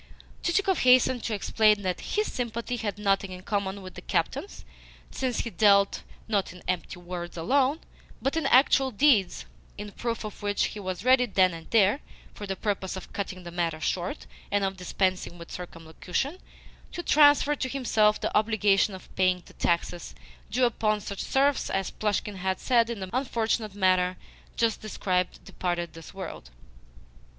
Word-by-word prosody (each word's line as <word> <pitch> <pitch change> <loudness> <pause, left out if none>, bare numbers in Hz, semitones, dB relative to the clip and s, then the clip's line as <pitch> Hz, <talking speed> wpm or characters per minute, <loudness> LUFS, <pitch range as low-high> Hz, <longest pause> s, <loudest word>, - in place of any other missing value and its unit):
Chichikov 380 +1 +1
hastened 250 -1 +5
to 220 - -1
explain 210 0 +3
that 185 -2 -2
HIS 425 +1 -1
sympathy 235 0 -3
had 205 -4 -3
nothing 195 -2 +1
in 185 0 -9
common 200 -1 -2
with 185 - -9
the - - -9
captain's, 400 - -2 0.5
since 255 -3 -1
he 230 - -5
dealt, 200 -2 +4 0.3
not 205 -4 0
in 180 0 -13
empty 180 -1 -2
words 175 -1 -7
alone, 270 - +2 0.4
but 270 +3 -1
in 320 -4 0
actual 265 0 +5
deeds; 215 - +3 0.3
in 205 0 -7
proof 230 +2 -3
of 210 -2 -8
which 205 0 0
he 210 - -7
was 185 +1 -5
ready 255 -1 +5
then 185 -4 +3
and 165 -1 -10
there 215 +3 +4 0.3
(for 205 - -8
the 195 - -2
purpose 195 -2 -2
of 190 - -9
cutting 185 -2 -4
the 170 - -8
matter 165 -2 -1
short, 175 +2 -2 0.2
and 200 0 +1
of 195 0 -1
dispensing 185 -1 -1
with 170 -1 -11
circumlocution) 180 - -4 0.5
to 345 - -5
transfer 290 -1 +5
to 260 - -3
himself 220 -5 +2
the - - -3
obligation 210 -2 +3
of 185 - -14
paying 185 -1 +2
the - - -16
taxes 170 0 -1 0.3
due 250 +3 +2
upon 215 -2 +1
such 200 -1 -6
serfs 275 +1 +1
as 195 -1 -1
Plushkin's 205 -2 -2
as 190 0 -2
had, 235 -2 +4
in 230 -4 -4
the 190 - -5
unfortunate 230 -4 -1
manner 185 -2 +2 0.4
just 230 -2 +1
described, 185 -4 -2
departed 175 -2 -3
this 165 -1 -11
world. 185 - -8
205 Hz, 165 wpm, -27 LUFS, 185-235 Hz, 0.5 s, hastened